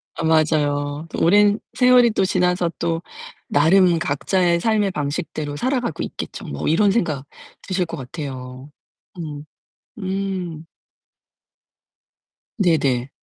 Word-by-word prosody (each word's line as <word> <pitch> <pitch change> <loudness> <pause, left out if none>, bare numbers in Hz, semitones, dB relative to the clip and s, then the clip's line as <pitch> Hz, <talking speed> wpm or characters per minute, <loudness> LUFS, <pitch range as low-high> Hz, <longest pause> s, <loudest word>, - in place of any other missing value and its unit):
아 - - -4
맞아요. 150 -2 +1
'또 - - -5
오랜 205 +4 +5 0.2
세월이 250 -2 +6
또 195 -3 +1
지나서 180 -2 +1
또 165 0 -1 0.5
나름 170 +3 +4
각자의 170 +4 +1
삶의 210 -1 +1
방식대로 150 -1 -3
살아가고 250 - -1
있겠죠.' - - -7
뭐 70 - -4
이런 195 +6 +4
생각 155 - -1 0.4
드실 185 -2 0
것 - - -7
같아요. 130 0 -7 0.5
음 150 -3 -6 0.6
음. 185 -4 -3 1.9
네네. 140 -8 +2
165 Hz, 220 characters per minute, -21 LUFS, 145-190 Hz, 1.9 s, 세월이